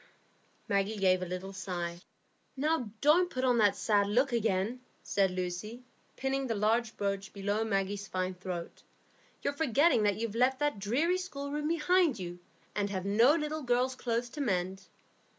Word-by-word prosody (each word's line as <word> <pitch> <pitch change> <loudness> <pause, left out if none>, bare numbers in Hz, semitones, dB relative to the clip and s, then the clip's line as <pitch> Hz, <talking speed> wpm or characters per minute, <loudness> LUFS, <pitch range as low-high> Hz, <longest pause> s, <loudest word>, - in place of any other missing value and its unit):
Maggie 200 0 0
gave 185 -2 +3
a 185 - -3
little 185 +2 -5
sigh. 175 -3 -4 0.6
"Now, 295 -4 0
don't 345 +5 +5
put 255 -4 -3
on 250 -2 +3
that 205 -2 +4
sad 205 -2 +2
look 250 +6 +2
again," 225 +1 0 0.2
said 195 -1 +2
Lucy, 185 +6 -4 0.3
pinning 270 0 -1
the 225 - -1
large 220 +2 +1
brooch 200 -1 -2
below 205 +2 -1
Maggie's 200 -1 -1
fine 185 0 -2
throat. 180 -2 -6 0.6
"You're - - 0
forgetting 285 -2 +3
that 205 -1 +2
you've 225 -1 -3
left 255 +3 +2
that 295 -7 0
dreary 290 - +1
schoolroom 295 -4 -4
behind 335 -3 +3
you, 175 -2 -6 0.4
and 205 -1 0
have 190 -1 -3
no 230 +9 +5
little 310 -1 -2
girls' 250 0 +1
clothes 240 -1 -2
to 295 - -6
mend." 190 -5 -1
220 Hz, 160 wpm, -31 LUFS, 195-265 Hz, 0.6 s, don't